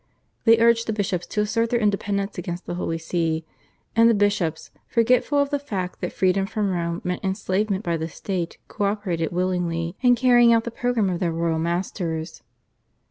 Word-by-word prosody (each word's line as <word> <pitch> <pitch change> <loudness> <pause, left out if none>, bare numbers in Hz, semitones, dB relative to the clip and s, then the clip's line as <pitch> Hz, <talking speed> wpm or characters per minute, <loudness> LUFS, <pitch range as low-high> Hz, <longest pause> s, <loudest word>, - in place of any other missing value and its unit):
They 230 -1 +7
urged 230 0 +3
the 220 - 0
bishops 185 -4 -2
to 210 - -1
assert 230 +2 0
their 240 - +1
independence 200 -1 0
against 175 0 -5
the - - -4
Holy 170 -2 -2
See, 165 -1 -1 0.5
and 230 0 +6
the 230 - +4
bishops, 200 -6 0 0.2
forgetful 250 +4 +2
of 285 0 +2
the 285 - 0
fact 195 -10 -5
that - - -2
freedom 190 +1 +1
from 210 -2 -1
Rome 170 -1 -2
meant 180 0 -3
enslavement 195 +1 -1
by 170 -1 0
the 160 0 -3
State, 175 -1 -4
co 205 - -2
operated 190 -6 -1
willingly 175 -1 -1
in 245 -1 +5
carrying 240 -1 +5
out 225 -1 +3
the 235 - -5
programme 230 -5 0
of 175 - -2
their 175 -3 0
royal 165 0 0
masters. 170 -1 -3
195 Hz, 185 wpm, -23 LUFS, 170-225 Hz, 0.5 s, They